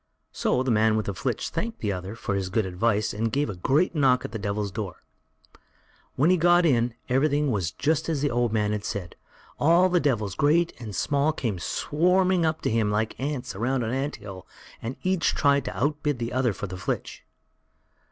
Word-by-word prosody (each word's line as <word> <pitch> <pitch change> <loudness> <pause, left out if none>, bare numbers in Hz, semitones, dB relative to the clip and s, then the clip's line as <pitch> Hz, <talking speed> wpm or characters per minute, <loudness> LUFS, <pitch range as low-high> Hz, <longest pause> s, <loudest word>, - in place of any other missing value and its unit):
So 125 - 0
the 130 - 0
man 110 0 +3
with 110 - -1
the 100 - -2
flitch 120 +4 -2
thanked 230 0 -3
the 105 - -1
other 95 +3 -5
for 105 - -3
his 95 -2 -2
good 105 +2 0
advice, 105 +3 0
and 110 +2 -1
gave 140 -2 0
a - - -7
great 135 - +1
knock 130 -5 +3
at - - -6
the 110 - -5
Devil's 100 0 -2
door. 95 -3 -6 1.1
When 155 +7 +3
he 185 - +4
got 175 +1 +4
in, 120 -5 +2
everything 145 +2 +2
was 95 -7 0
just 160 - -1
as 155 -3 0
the 145 0 0
old 120 -1 +1
man 105 -2 +1
had 105 -1 -2
said. 95 -4 -5 0.4
All 170 +5 +5
the 180 -1 +3
devils, 110 - 0
great 165 - +2
and 110 -5 -7
small, 145 - +1
came 115 - -3
swarming 180 - +2
up 155 0 -2
to - - 0
him 110 -2 +1
like 110 +1 0
ants 135 -3 -3
round 125 +5 0
an 110 - -2
anthill, 105 - -5 0.3
and 120 +4 -4
each 185 -2 +1
tried 140 -2 +3
to - - -5
outbid 150 0 0
the 115 0 -4
other 130 -2 +2
for 105 - -5
the 95 -2 -7
flitch. - - -4
125 Hz, 200 wpm, -26 LUFS, 105-150 Hz, 1.1 s, All